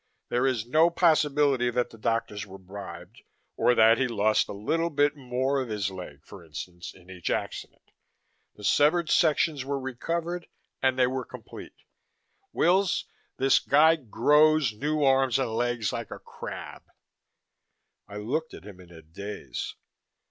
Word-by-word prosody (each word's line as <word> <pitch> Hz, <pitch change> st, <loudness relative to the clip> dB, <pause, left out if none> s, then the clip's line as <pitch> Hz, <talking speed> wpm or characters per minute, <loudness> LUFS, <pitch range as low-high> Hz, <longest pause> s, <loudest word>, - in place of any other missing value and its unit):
There 125 Hz, +2 st, +1 dB
is 120 Hz, -4 st, -1 dB
no 155 Hz, +7 st, +4 dB
possibility 150 Hz, -6 st, +3 dB
that 120 Hz, 0 st, -1 dB
the 115 Hz, -, -13 dB
doctors 110 Hz, -2 st, -2 dB
were 95 Hz, 0 st, -10 dB
bribed, 95 Hz, 0 st, -10 dB, 0.3 s
or 125 Hz, -, +3 dB
that 115 Hz, 0 st, +5 dB
he 135 Hz, -, +2 dB
lost 110 Hz, -2 st, +2 dB
a -, -, -4 dB
little 160 Hz, +12 st, -1 dB
bit 145 Hz, -1 st, +2 dB
more 130 Hz, 0 st, -1 dB
of 130 Hz, -, -5 dB
his 100 Hz, -2 st, -2 dB
leg, 80 Hz, -6 st, -10 dB
for 95 Hz, -, -12 dB
instance, 85 Hz, +3 st, -8 dB
in 90 Hz, -1 st, -19 dB
each 90 Hz, -2 st, -5 dB
accident -, -, -5 dB, 0.6 s
the 105 Hz, -, -14 dB
severed 155 Hz, -, +3 dB
sections 155 Hz, -3 st, +2 dB
were 140 Hz, +1 st, -2 dB
recovered, 165 Hz, +7 st, -4 dB, 0.3 s
and 130 Hz, -1 st, +2 dB
they 130 Hz, -, +4 dB
were 130 Hz, +1 st, -2 dB
complete. -, -, -12 dB, 0.7 s
Wills, 185 Hz, +2 st, +2 dB, 0.3 s
this 135 Hz, +1 st, +4 dB
guy 155 Hz, +3 st, +5 dB
grows 150 Hz, +1 st, +3 dB
new 150 Hz, +7 st, -1 dB
arms 135 Hz, -2 st, +3 dB
and 130 Hz, -4 st, -1 dB
legs 120 Hz, -2 st, -1 dB
like -, -, -5 dB
a -, -, -7 dB
crab!" -, -, -9 dB, 1.3 s
I 105 Hz, -, -8 dB
looked 145 Hz, +10 st, -3 dB
at -, -, -13 dB
him 100 Hz, -3 st, -11 dB
in 90 Hz, -1 st, -15 dB
a 80 Hz, -2 st, -13 dB
daze. 100 Hz, +7 st, -7 dB
125 Hz, 155 wpm, -27 LUFS, 105-150 Hz, 1.3 s, that